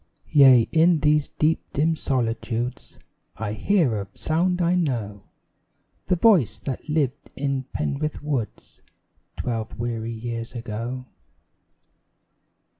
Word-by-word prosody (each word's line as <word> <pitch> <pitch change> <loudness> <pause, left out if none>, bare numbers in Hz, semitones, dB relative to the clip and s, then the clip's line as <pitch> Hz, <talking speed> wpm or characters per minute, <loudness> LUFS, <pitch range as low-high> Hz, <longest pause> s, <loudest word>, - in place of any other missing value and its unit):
Yea, 130 -6 +7
in 165 -1 +4
these 150 -1 +3
deep 155 +1 +1
dim 160 +3 +2
solitudes 120 -3 -2 0.4
I 105 -1 -3
hear 135 - +1
a 100 - -7
sound 180 +3 0
I 175 0 +2
know 120 - -1 0.9
The 180 - +3
voice 180 - +4
that 135 +2 -6
lived 145 -3 -1
in 135 -1 -2
Penrith 150 +1 -3
woods 135 -7 -4 0.6
Twelve 115 -2 -3
weary 115 -1 -3
years 115 +1 -5
ago. 120 +2 -5
130 Hz, 110 wpm, -24 LUFS, 115-155 Hz, 0.9 s, Yea